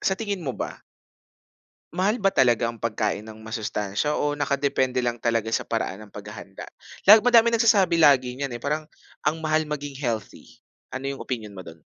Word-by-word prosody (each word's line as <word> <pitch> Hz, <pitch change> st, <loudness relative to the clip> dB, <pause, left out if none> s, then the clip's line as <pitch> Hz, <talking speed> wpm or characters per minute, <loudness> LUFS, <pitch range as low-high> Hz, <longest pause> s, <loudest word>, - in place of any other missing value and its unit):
sa 190 Hz, -, 0 dB
tingin 205 Hz, -4 st, -3 dB
mo 135 Hz, -6 st, -4 dB
ba? -, -, -5 dB, 1.1 s
Mahal 195 Hz, +6 st, +1 dB
ba 195 Hz, -3 st, +1 dB
talaga 120 Hz, -3 st, +3 dB
ang 115 Hz, -1 st, -5 dB
pagkain 110 Hz, -2 st, -1 dB
ng 110 Hz, 0 st, -12 dB
masustansiya 110 Hz, +4 st, -2 dB
o 145 Hz, 0 st, 0 dB
naka-depende 140 Hz, -3 st, 0 dB
lang 120 Hz, -1 st, -2 dB
talaga 115 Hz, -1 st, 0 dB
sa -, -, -1 dB
paraan 110 Hz, -3 st, -3 dB
ng -, -, -21 dB
pag-hahanda? 105 Hz, -1 st, -9 dB, 0.4 s
Lag 215 Hz, +3 st, +9 dB
madaming 235 Hz, -1 st, +5 dB
nagsasabi 190 Hz, -7 st, +4 dB
lagi 130 Hz, -4 st, +5 dB
niyan 135 Hz, -1 st, -4 dB
eh, 120 Hz, -, -19 dB
parang 150 Hz, +2 st, -2 dB, 0.3 s
ang 160 Hz, -, 0 dB
mahal 155 Hz, -1 st, 0 dB
maging 145 Hz, -1 st, -4 dB
healthy, 115 Hz, -1 st, -5 dB, 0.3 s
ano 130 Hz, +1 st, -6 dB
'yong -, -, -9 dB
opinyon 110 Hz, -5 st, -5 dB
mo 95 Hz, -, -8 dB
do'n? 80 Hz, -3 st, -13 dB
130 Hz, 175 wpm, -24 LUFS, 110-155 Hz, 1.1 s, Lag